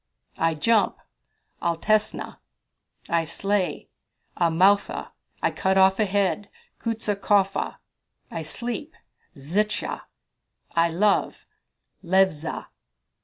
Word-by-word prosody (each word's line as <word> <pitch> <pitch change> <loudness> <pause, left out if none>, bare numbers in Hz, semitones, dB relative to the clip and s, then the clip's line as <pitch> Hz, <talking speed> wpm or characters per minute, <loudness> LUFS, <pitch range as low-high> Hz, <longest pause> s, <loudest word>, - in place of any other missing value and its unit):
"I 165 0 +2
jump 215 +8 +2 0.6
Altesna." 195 +6 0 0.7
"I 170 -1 +2
slay 195 +4 -1 0.5
Amoutha." 180 +4 +2 0.3
"I - - +3
cut 190 0 +1
off 190 +1 +5
a 215 - +3
head 200 0 0 0.3
Ksutaskofa." 205 -3 0 0.6
"I 165 - -4
sleep 240 - -4 0.4
Zlcha." 190 +10 -1 0.7
"I 170 0 +4
love 195 +5 +1 0.6
Levza." 180 -4 +1
190 Hz, 80 wpm, -25 LUFS, 170-205 Hz, 0.7 s, off